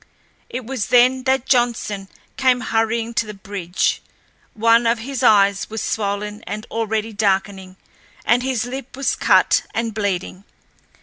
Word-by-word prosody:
It 250 Hz, -1 st, -5 dB
was 255 Hz, -3 st, -3 dB
then 255 Hz, +1 st, +4 dB
that 265 Hz, -1 st, +1 dB
Johnson 235 Hz, -6 st, 0 dB, 0.3 s
came 255 Hz, -2 st, +2 dB
hurrying 225 Hz, 0 st, -1 dB
to 230 Hz, -1 st, 0 dB
the 210 Hz, -, -7 dB
bridge. 195 Hz, -2 st, -2 dB, 0.5 s
One 230 Hz, +1 st, +4 dB
of 230 Hz, +1 st, +2 dB
his 260 Hz, +3 st, -5 dB
eyes 200 Hz, -5 st, +4 dB
was 220 Hz, +1 st, -4 dB
swollen 210 Hz, 0 st, -3 dB
and 215 Hz, +2 st, -5 dB
already 220 Hz, -1 st, -2 dB
darkening, 195 Hz, -2 st, -1 dB, 0.5 s
and 240 Hz, +2 st, +3 dB
his 250 Hz, -3 st, -1 dB
lip 265 Hz, +1 st, -7 dB
was 275 Hz, -, 0 dB
cut -, -, +4 dB
and 230 Hz, -1 st, -1 dB
bleeding. 195 Hz, -2 st, -3 dB
225 Hz, 140 wpm, -20 LUFS, 205-245 Hz, 0.5 s, then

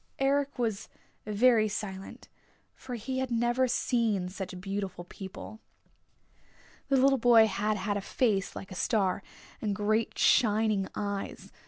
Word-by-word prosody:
Eric 275 Hz, +1 st, +1 dB
was 225 Hz, -5 st, -2 dB, 0.4 s
very 215 Hz, +1 st, +4 dB
silent, 195 Hz, -2 st, -6 dB, 0.5 s
for 255 Hz, -2 st, -7 dB
he 260 Hz, +3 st, -3 dB
had 260 Hz, -1 st, -2 dB
never 240 Hz, +2 st, +1 dB
seen 225 Hz, -7 st, 0 dB
such 185 Hz, -1 st, -6 dB
beautiful 195 Hz, -1 st, -4 dB
people. 190 Hz, +4 st, -9 dB, 1.3 s
The 275 Hz, -, +4 dB
little 270 Hz, +1 st, +4 dB
boy 230 Hz, -1 st, +7 dB
had 210 Hz, +1 st, -1 dB
had 205 Hz, +1 st, -1 dB
a -, -, -3 dB
face 200 Hz, -3 st, 0 dB
like 195 Hz, -, -8 dB
a -, -, -5 dB
star, 195 Hz, -1 st, 0 dB, 0.4 s
and 210 Hz, -2 st, -1 dB
great 215 Hz, +2 st, 0 dB
shining 215 Hz, -4 st, +3 dB
eyes. 200 Hz, -1 st, -4 dB
215 Hz, 135 wpm, -29 LUFS, 195-240 Hz, 1.3 s, boy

